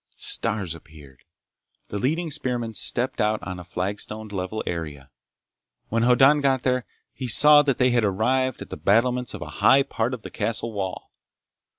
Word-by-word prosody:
Stars 105 -7 0
appeared. 75 -6 -15 0.6
The 100 - -4
leading 160 - -1
spearmen 125 -6 -2
stepped 125 +4 0
out 105 0 +1
on 90 -1 -6
a - - -8
flagstoned 100 +4 -5
level 95 +2 -4
area. 75 -5 -6 0.8
When 115 +1 0
Hoddan 135 +5 +5
got 135 -2 +1
there 125 -1 0 0.3
he 130 - -5
saw 150 +5 +6
that 135 -3 0
they 125 0 +3
had 120 -2 +2
arrived 125 +6 0
at - - -18
the - - -5
battlements 125 +4 +1
of - - -6
a - - -10
high 135 +1 +6
part 125 -2 -2
of 115 - -15
the - - -8
castle 115 0 -3
wall. 95 -3 -5
115 Hz, 170 wpm, -24 LUFS, 95-130 Hz, 0.8 s, saw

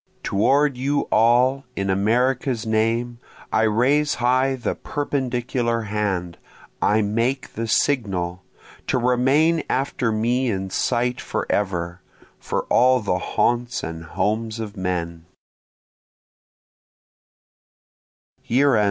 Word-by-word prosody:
Toward 135 +7 +2
you 140 +3 0
all, 125 +4 +3
in 100 -1 -1
America's 120 +4 +1
name, 115 +2 0 0.3
I - - +3
raise 140 +7 +2
high 130 +2 +2
the 125 - -2
perpendicular 125 -4 -2
hand, 100 -5 -2 0.4
I 110 +1 +3
make 115 +6 -1
the 115 0 -3
signal, 95 -8 0 0.5
To - - +1
remain 135 +7 +2
after 130 -3 0
me 120 +4 0
in 95 -2 -3
sight 125 +3 0
forever, 90 -3 -2 0.4
For - - -2
all 130 +1 +4
the 95 -3 -1
haunts 120 +5 0
and 80 0 -6
homes 110 +6 -2
of 110 -1 -6
men. 85 -3 -3
115 Hz, 100 wpm, -22 LUFS, 100-130 Hz, 0.5 s, all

